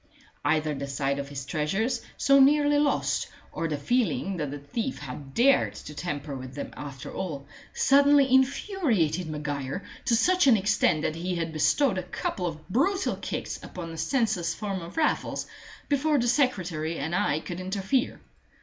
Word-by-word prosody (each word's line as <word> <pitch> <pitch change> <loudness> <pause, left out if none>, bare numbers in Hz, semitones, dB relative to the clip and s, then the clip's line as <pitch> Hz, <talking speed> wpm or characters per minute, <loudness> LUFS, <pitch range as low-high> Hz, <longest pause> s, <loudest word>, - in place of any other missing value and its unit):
Either 155 -1 +1
the 140 0 -4
sight 140 0 -1
of 140 0 -5
his 140 -2 -6
treasures, 175 - -1 0.2
so 275 0 +5
nearly 290 +1 +5
lost, 290 -1 +1 0.2
or 165 - -2
the 150 -2 -2
feeling 240 - 0
that 150 -3 -2
the 145 - -5
thief 220 - -4
had 135 0 -8
dared 270 +3 +4
to 150 - -9
tamper 145 -3 -4
with 130 0 -8
them 145 - -6
after 140 -2 -8
all, 155 -7 -4 0.3
suddenly 280 -1 +5
infuriated 255 - +2
Maguire 145 +2 -4 0.2
to 235 - +3
such 365 +6 +3
an 240 -4 +7
extent 200 -6 +2
that 155 - -1
he 180 +2 -2
had 165 -1 -3
bestowed 190 - +2
a 180 -1 -8
couple 180 -2 -2
of 155 -2 -7
brutal 370 - +1
kicks - - -5
upon 170 -2 -7
the 165 - -8
senseless 225 - 0
form 200 -3 -3
of 170 +2 -10
Raffles 315 - 0 0.4
before 295 +1 +2
the 240 -2 +1
secretary 185 - 0
and 160 +4 -3
I 155 -4 +1
could 175 +2 -6
interfere. 195 +7 -1
180 Hz, 170 wpm, -27 LUFS, -, 0.4 s, an